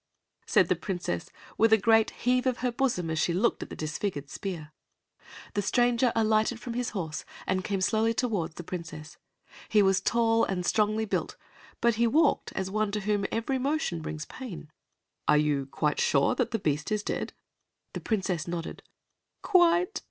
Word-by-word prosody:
said - - +4
the - - +2
Princess, 175 - -4 0.3
with 225 +1 +5
a 220 - +8
great 225 +1 +4
heave 250 +1 0
of 255 -2 +1
her 250 - +2
bosom 235 -10 0
as 160 - -1
she 170 - +1
looked 220 +6 +1
at - - -6
the - - -7
disfigured 150 -2 -4
spear. 165 -7 -6 0.8
The 205 - 0
stranger 240 +3 +2
alighted 220 +1 +2
from 240 0 -6
his 245 0 -1
horse 160 -6 -4 0.2
and 185 0 0
came 195 -1 -2
slowly 225 +4 +2
toward 205 -9 -1
the 175 - -7
Princess. 160 -3 -7 0.5
He 210 -2 +5
was 195 0 +3
tall 230 +1 +2
and 180 -2 -1
strongly 215 +2 +1
built, - - -2 0.4
but 235 -1 +3
he 235 - +5
walked 300 +4 +2
as 190 0 -3
one 215 0 0
to 210 - -1
whom 205 0 0
every 260 +4 -1
motion 275 - -1
brings 155 -1 -5
pain. 190 - -9 0.6
"Are 150 - +5
you 145 -2 +1
quite 150 +1 -1
sure 140 -1 +3
that - - 0
the 225 - -1
beast 150 -2 -1
is 210 -1 0
dead?" - - -3 0.6
The - - -5
Princess 190 -7 -1
nodded. 170 -1 -5 0.6
"Quite." 360 +1 +3
210 Hz, 175 wpm, -28 LUFS, 170-235 Hz, 0.8 s, a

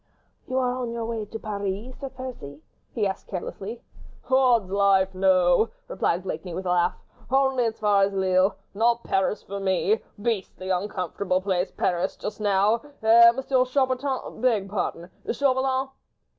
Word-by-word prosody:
"You 255 - -2
are 250 -1 +1
on 245 -2 -3
your 230 -1 -3
way 225 -2 -3
to 215 +2 -7
Paris, 210 +3 -4
Sir 275 - -5
Percy?" 235 - -9 0.3
he 220 -4 -1
asked 190 -1 -3
carelessly. 200 +4 -6 0.5
"Odd's 245 -7 +4
life, 195 -1 +3
no," 185 +2 +3 0.2
replied 180 -1 -1
Blakeney, 175 -1 -5
with 185 +1 -5
a 180 - 0
laugh. 175 0 +2 0.3
"Only 265 -2 +2
as 225 -1 -2
far 205 -2 +3
as 195 0 +3
Lille—not 195 +5 +1
Paris 195 +2 0
for 200 +1 -6
me... 195 +3 +1 0.2
beastly 200 -4 -3
uncomfortable 185 0 -1
place 185 -1 -1
Paris, 180 0 -1
just 210 +1 -6
now... 205 +3 +2 0.2
eh, 230 +1 +8
Monsieur 265 -1 +2
Chaubertin... 260 -1 -1
beg 225 -6 +2
pardon... 180 -3 -3 0.2
Chauvelin!" 265 0 +1
205 Hz, 145 wpm, -25 LUFS, 190-245 Hz, 0.5 s, eh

